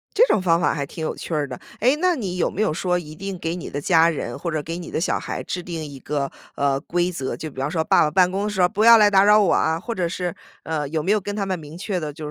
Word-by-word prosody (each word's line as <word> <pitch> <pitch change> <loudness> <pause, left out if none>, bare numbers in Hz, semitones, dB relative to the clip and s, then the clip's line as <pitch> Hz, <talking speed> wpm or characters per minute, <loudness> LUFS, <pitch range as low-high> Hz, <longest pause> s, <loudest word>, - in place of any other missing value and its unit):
这 465 +4 +6
种 210 - +2
方 170 -2 +3
法 - - +2
还 140 -2 -2
挺 160 - -9
有 - - -3
趣 165 - -6
儿 150 -2 0
的。 - - -8 0.2
哎， 255 +6 +4
那 360 0 +2
你 190 - -4
有 - - +1
没 205 - -3
有 155 - +1
说 180 +2 0
一 155 -3 -7
定 195 +2 -5
给 165 +1 -3
你 180 - -6
的 145 - -4
家 165 +2 +4
人 120 -6 -4
或 170 - -4
者 155 -2 -1
给 165 +2 -5
你 175 -1 -7
的 - - -1
小 170 - 0
孩 - - -5
制 180 - -4
定 165 -3 -5
一 140 -2 -9
个， 140 -1 -3 0.2
呃， 140 -1 +1
规 175 +1 -1
则， 135 -6 -4
就 155 - -6
比 130 - -10
方 140 - -1
说” 160 -1 0
爸 - - +4
爸 150 - +1
办 180 +1 +4
公 195 +2 -2
地 - - -1
时 200 -3 -1
候 180 - +6
不 215 0 0
要 230 0 +9
来 210 -1 +6
打 195 0 +6
扰 210 +1 +6
我 195 - +3
啊！ 160 +1 +1
“或 235 +6 -4
者 180 -5 -1
是， 180 -1 -3 0.3
呃， 155 -3 -2
有 155 0 -2
没 190 - +1
有 215 - +3
跟 205 +2 -5
他 200 -2 -1
们 185 -2 -2
明 155 +1 -10
确 185 0 -2
地 150 -2 -4
就 150 +1 -7
175 Hz, 340 characters per minute, -22 LUFS, 155-195 Hz, 0.3 s, 要